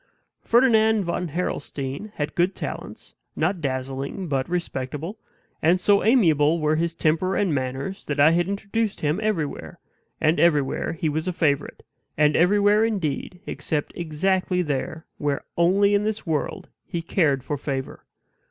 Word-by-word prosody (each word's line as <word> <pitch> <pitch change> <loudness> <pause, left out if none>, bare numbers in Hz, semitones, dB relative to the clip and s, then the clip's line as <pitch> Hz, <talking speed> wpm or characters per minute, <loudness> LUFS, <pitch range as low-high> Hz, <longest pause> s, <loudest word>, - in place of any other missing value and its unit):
Ferdinand 220 -3 +4
von 180 0 -2
Harrelstein 145 +1 -4
had 150 0 -3
good 175 +3 +1
talents, - - -7 0.2
not 175 +2 0
dazzling 135 +6 -3
but 135 -3 -1
respectable; 165 - -4 0.4
and 170 +4 +4
so 200 +2 +3
amiable 165 - +4
were 155 0 +2
his 165 +1 -1
temper 165 +4 +1
and 195 -6 +1
manners 135 +7 -3
that 145 -1 -2
I 150 +3 +7
had 175 +1 +2
introduced 200 +2 -2
him 150 +5 0
everywhere, 195 -9 -2 0.4
and 160 +1 +2
everywhere 150 -3 +2
he 160 0 -2
was 155 +3 -2
a - - +1
favorite; 150 -5 -1 0.3
and 150 0 +4
everywhere, 205 +4 +4
indeed, 180 -5 -2
except 150 -3 -3
exactly 180 +3 0
there 155 +2 -3
where 145 -1 -1
only 195 +4 +3
in 205 0 +3
this 215 0 -2
world 155 -4 -2
he 170 -1 -5
cared 145 -7 +1
for 145 - -2
favor. 135 -2 -5
165 Hz, 145 wpm, -24 LUFS, 145-195 Hz, 0.4 s, I